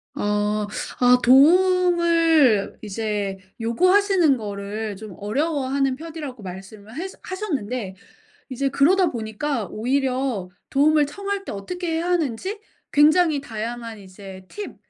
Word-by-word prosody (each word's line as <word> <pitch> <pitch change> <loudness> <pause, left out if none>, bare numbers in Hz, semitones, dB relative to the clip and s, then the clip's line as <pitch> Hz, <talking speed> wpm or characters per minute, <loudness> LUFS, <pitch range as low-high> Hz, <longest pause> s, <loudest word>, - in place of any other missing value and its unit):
어. 210 0 0 0.3
아 250 0 +6
도움을 330 - +4
이제 205 -2 -3 0.2
요구하시는 365 - +3
거를 205 0 -5
좀 205 -3 -10
어려워하는 275 +3 -1
편이라고 300 -7 -8
말씀을 200 +4 -10
해서 375 +4 -6
하셨는데 255 - -4 0.5
이제 270 +2 -1
그러다 355 +7 +3
보니까 230 +1 -3
오히려 255 -4 -1 0.2
도움을 295 +1 +3
청할 400 +5 -4
때 - - -5
어떻게 335 - -4
해야 335 +2 -1
하는지 355 - -1 0.3
굉장히 305 0 +4
다양한 230 -1 -6
이제 190 0 -12
팁 415 - -7
265 Hz, 270 characters per minute, -23 LUFS, 210-330 Hz, 0.5 s, 아